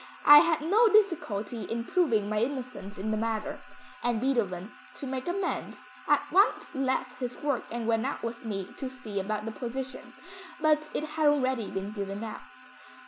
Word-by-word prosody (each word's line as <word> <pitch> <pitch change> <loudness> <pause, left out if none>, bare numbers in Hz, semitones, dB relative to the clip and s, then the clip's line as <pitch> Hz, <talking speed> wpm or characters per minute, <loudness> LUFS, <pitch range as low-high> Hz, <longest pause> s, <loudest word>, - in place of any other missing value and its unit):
I 295 0 +11
had 320 0 +2
no 415 +9 +5
difficulty 275 - +2
in 230 0 -3
proving 235 - +2
my 210 0 0
innocence 245 -5 -4
in 210 +3 -2
the 215 - 0
matter, 220 -1 -2 0.4
and 240 -2 0
Beethoven, 215 -8 0 0.2
to - - -6
make 260 +1 -4
amends, 365 +1 -3 0.2
at - - +3
once 395 +3 +3
left 260 -2 -1
his 250 -1 -4
work 285 -4 -1
and 235 0 -3
went 230 +2 +2
out 280 - -4
with 230 +1 -4
me 200 -4 -4
to 265 - -4
see 220 -6 -5
about 210 +2 -2
the 225 - -3
position, 250 +2 -6 0.5
but 305 -1 +2
it - - 0
had 310 0 +1
already 260 -6 +2
been 195 +1 -4
given 200 0 -4
out." 220 - -6
250 Hz, 175 wpm, -29 LUFS, 215-290 Hz, 0.5 s, I